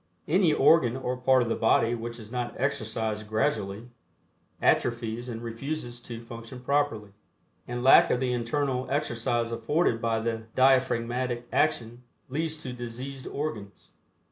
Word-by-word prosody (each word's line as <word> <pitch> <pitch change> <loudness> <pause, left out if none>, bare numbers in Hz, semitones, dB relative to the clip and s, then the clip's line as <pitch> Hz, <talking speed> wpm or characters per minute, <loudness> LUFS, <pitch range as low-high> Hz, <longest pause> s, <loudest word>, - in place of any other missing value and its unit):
Any 175 +1 +4
organ 150 -4 +4
or 130 -1 -2
part 130 0 +3
of - - -4
the - - +2
body 115 +1 +3
which 115 0 -5
is 110 0 -11
not 125 -1 -3
exercised 110 -4 -2
gradually 110 -1 -1 0.7
atrophies 120 0 0
and 115 -1 -6
refuses 120 +1 -5
to 120 -1 -8
function 115 +2 -9
properly, 125 -7 0 0.6
and 120 0 -4
lack 135 - +7
of 125 - +2
the 125 -1 0
internal 125 +2 -1
exercise 120 -4 -1
afforded 115 +1 +1
by 115 -1 +1
the 110 0 -3
diaphragmatic 125 -2 +2
action 120 +1 0 0.3
leads 155 +3 -2
to 130 - -5
diseased 125 +3 -7
organs. 110 -10 -5
120 Hz, 140 wpm, -27 LUFS, 115-130 Hz, 0.7 s, lack